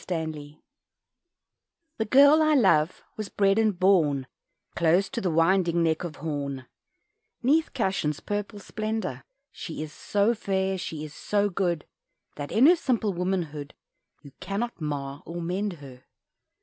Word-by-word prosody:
_ 155 -4 -4 1.4
The 220 - +1
girl 285 +7 +6
I 310 -1 +4
love 185 - +3
was 215 -2 -4
bred 195 +1 +2
and 215 -4 +2
born 160 -8 +3 0.5
Close 170 +3 +3
to 245 -4 -4
the 185 - 0
"winding" 170 +1 +2
neck 160 0 +1
of 165 -4 -5
Horn, 140 -3 -4 0.8
'Neath 310 +6 +3
Cashan's 190 - -1
purple 205 +1 -4
splendour. 215 - -4 0.3
She 160 -3 -6
is 155 -1 -9
so 205 +7 +1
fair, 190 -3 -1
she 155 -3 -5
is 150 - -10
so 205 +4 0
good, 175 -4 -1 0.5
That, 145 -1 -6
in 235 +5 +5
her 345 +4 +8
simple 235 - 0
womanhood, 170 -5 -3 0.5
You 140 - -12
cannot 205 0 -4
mar 140 -2 -4
or 170 +1 -6
mend 185 +4 -2
her. 135 -5 -13
180 Hz, 140 wpm, -26 LUFS, 155-210 Hz, 1.4 s, her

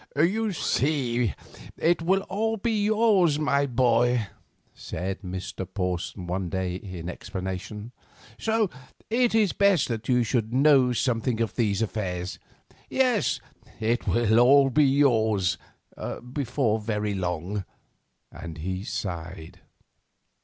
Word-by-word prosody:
"You 205 +9 +2
see, 125 - 0 0.4
it 170 +1 +2
will 190 +4 +2
all 220 +3 -1
be 215 -1 0
yours, 210 -8 +3
my 140 -2 +1
boy," 120 -2 +2 0.4
said 95 +3 -5
Mr. 95 0 -5
Porson 90 -1 -3
one 90 +1 -2
day, 95 0 -2
in 90 -2 -7
explanation; 95 +5 -6 0.5
"so 220 -3 +1 0.4
it 240 -1 +2
is 215 -4 +3
best 200 -8 +3
that 115 0 -4
you 125 -1 +4
should 115 -1 -1
know 135 -1 +5
something 120 -1 0
of 115 -3 -1
these 105 -3 +1
affairs. 90 -4 -4 0.5
Yes, 255 -6 +2 0.4
it 115 +2 0
will 115 -1 +3
all 135 +2 +6
be 150 +3 +4
yours, 110 -9 +2 0.7
before 125 -5 0
very 105 -1 -2
long," 90 +1 -3 0.7
and 85 -1 -8
he 95 +4 -4
sighed. 90 -6 -6
115 Hz, 115 wpm, -26 LUFS, 95-150 Hz, 0.7 s, all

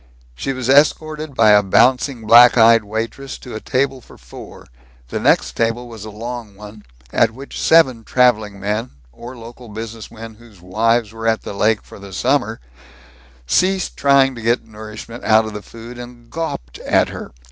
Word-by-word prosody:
She 100 - -4
was 130 -2 -4
escorted 155 +1 +2
by 110 -3 +5
a 105 0 +6
bouncing, 125 +4 +2
black 120 +3 +7
eyed 115 -1 +6
waitress 115 +6 -5
to 125 - -11
a 110 - -5
table 135 +2 -1
for - - -17
four. - - -13 0.4
The - - -3
next - - +2
table 115 +1 -1
was 110 -3 -10
a - - -7
long 115 0 -7
one, 105 +1 -13 0.3
at 115 - +3
which 135 +2 -8
seven 130 -8 +4
traveling 110 -5 +1
men, 105 +5 -2 0.2
or 120 - -11
local 115 +1 -12
business 110 +1 -8
men 115 0 -10
whose 110 -3 -19
wives 110 +5 0
were 115 0 -5
at 110 -1 +1
the - - -6
lake 105 +2 +1
for - - -14
the 100 -1 -11
summer, 120 -1 0 0.9
ceased 185 - +1
trying 140 -1 +3
to 120 - -9
get 115 +2 0
nourishment 110 +2 -10
out 110 0 +4
of 110 - -7
the 105 - -6
food, 115 +3 -11
and 120 -1 -12
gawped 65 - -5
at - - +2
her. - - -8
115 Hz, 180 wpm, -18 LUFS, 110-125 Hz, 0.9 s, black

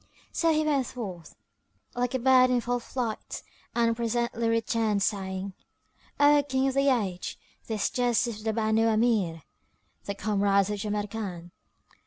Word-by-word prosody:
So 330 -1 +2
he 310 0 +2
went 280 -5 +1
forth, 190 -9 -7 0.6
like 245 +1 -1
a - - +3
bird 255 0 +5
in 250 -1 +3
full 245 +1 -1
flight, 235 -2 -4 0.3
and 230 -1 +2
presently 235 0 -1
returned, 225 -2 +1
saying, 190 -1 -2 0.7
"O 290 0 +6
King 265 +1 +2
of - - -3
the 275 +1 +3
Age, 195 -8 -1 0.3
this 215 -3 0
dust 245 -1 +2
is 230 -3 -5
of 215 - -12
the 220 - +2
Banu 220 0 +2
Amir, 215 -8 +1 0.6
the 200 - -3
comrades 200 -1 +2
of 205 - -3
Jamrkan." 205 -4 -4
225 Hz, 150 wpm, -27 LUFS, 205-245 Hz, 0.7 s, O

